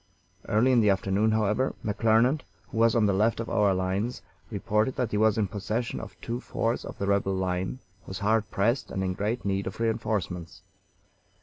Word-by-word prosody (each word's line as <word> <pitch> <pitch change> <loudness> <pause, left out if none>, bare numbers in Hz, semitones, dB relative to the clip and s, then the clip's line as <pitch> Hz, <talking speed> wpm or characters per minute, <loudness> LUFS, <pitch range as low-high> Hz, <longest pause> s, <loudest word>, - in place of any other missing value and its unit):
Early 115 +5 +4
in 120 -2 +5
the 105 - +4
afternoon, 100 +2 +2
however, 110 +4 +1
McClernand, 115 +6 +3 0.3
who 110 - -3
was 115 0 +4
on 115 -2 +4
the 100 - +3
left 110 +4 +2
of 115 - -4
our 105 -3 +3
lines, 95 +6 -2 0.3
reported 105 +3 0
that 125 -4 -1
he 105 - 0
was 110 0 +3
in 110 - +2
possession 105 +5 -3
of - - -10
two 120 +1 -3
forts 115 -2 -2
of - - -8
the 100 - -2
rebel 100 -1 +1
line, 95 +4 -1 0.3
was 95 - -5
hard 110 +1 +1
pressed, 115 +6 0
and 95 - -2
in 95 -1 -1
great 105 +5 -2
need 100 0 -1
of 95 - -6
re 115 -1 +2
enforcements. 90 -6 -3
105 Hz, 195 wpm, -27 LUFS, 100-115 Hz, 0.3 s, in